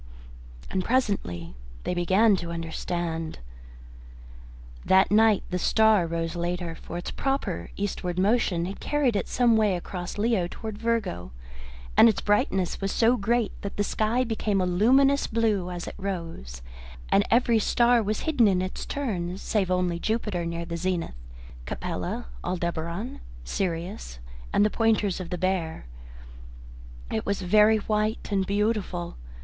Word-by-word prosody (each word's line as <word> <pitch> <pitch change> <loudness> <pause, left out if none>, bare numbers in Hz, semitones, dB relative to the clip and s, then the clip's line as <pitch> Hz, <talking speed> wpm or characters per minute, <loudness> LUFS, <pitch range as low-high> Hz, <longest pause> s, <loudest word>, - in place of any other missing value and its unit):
And 185 - 0
presently 190 - -1 0.3
they - - -1
began 190 +5 +4
to 170 -1 -5
understand. 165 0 -3 1.5
That 190 +1 +4
night 215 -1 +5
the 180 - -1
star 220 -3 +4
rose 165 0 -3
later, 175 0 -2
for 165 +1 -8
its 175 - -5
proper 270 - -2
eastward 185 -3 -3
motion 190 -3 +2
had 195 +2 -6
carried 285 -6 +1
it 200 - -1
some 240 -2 +3
way 210 -3 +3
across 175 +1 -6
Leo 210 -4 +1
towards 215 +1 -7
Virgo, 220 - -1 0.6
and 230 - +8
its 220 - 0
brightness 195 -3 +1
was 195 0 -1
so 230 +2 +4
great 230 0 +1
that 200 - -6
the 205 - +2
sky 220 +4 +1
became 220 -4 -1
a 185 - +1
luminous 265 +10 +4
blue 215 -5 0
as 175 -1 -5
it - - -5
rose, 165 - -5 0.5
and 200 - +4
every 235 -1 +4
star 235 +2 +3
was 215 0 -2
hidden 270 -8 +3
in 190 -2 +2
its 185 - -5
turn, 185 -10 -3
save 200 -2 -1
only 180 -2 0
Jupiter 210 -5 -1
near 170 0 -4
the 170 0 -4
zenith, 180 -1 -2 0.5
Capella, - - -4 0.2
Aldebaran, 170 +5 -3 0.2
Sirius, 170 - -3 0.3
and 205 - +4
the 210 - +1
pointers 215 -4 +1
of 180 -2 -6
the 180 - -3
Bear. 175 - -1 1.3
It 110 - -1
was 200 -1 -2
very 210 +4 +5
white 215 +1 -1
and 195 -2 +1
beautiful. 200 - -1
195 Hz, 145 wpm, -26 LUFS, 175-220 Hz, 1.5 s, and